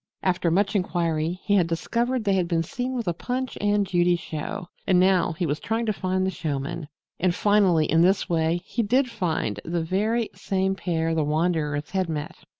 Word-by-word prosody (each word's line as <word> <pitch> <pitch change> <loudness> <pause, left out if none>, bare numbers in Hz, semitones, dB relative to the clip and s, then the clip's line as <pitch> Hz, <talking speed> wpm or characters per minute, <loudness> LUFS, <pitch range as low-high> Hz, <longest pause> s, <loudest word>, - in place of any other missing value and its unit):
After 180 -2 +1
much 200 +5 +1
inquiry 170 -2 0
he 205 - +1
had 175 -3 +3
discovered 235 +9 -1
they 200 -2 +2
had 185 -2 +1
been 165 -1 +1
seen 250 +9 -4
with 235 -5 -3
a 175 - +1
Punch 255 +8 -3
and 205 0 +2
Judy 175 -1 +2
show 165 +1 -5 0.2
and 185 -2 +4
now 185 -2 +3
he 170 +2 -2
was 150 0 -1
trying 225 +1 -1
to 215 - +1
find 185 -1 -1
the 190 - 0
showmen. 150 -1 -4 0.3
And 180 -1 +1
finally, 195 -6 +3
in 160 +2 +3
this 190 +3 +3
way, 165 0 +1
he 235 - -1
did 250 +4 +2
find 160 - -1
the 170 0 -2
very 215 +7 0
same 190 0 -1
pair 165 -4 -1
the 160 -1 +1
wanderers 150 -1 0
had 190 -3 0
met! 150 -2 -4
180 Hz, 195 wpm, -25 LUFS, 165-205 Hz, 0.3 s, and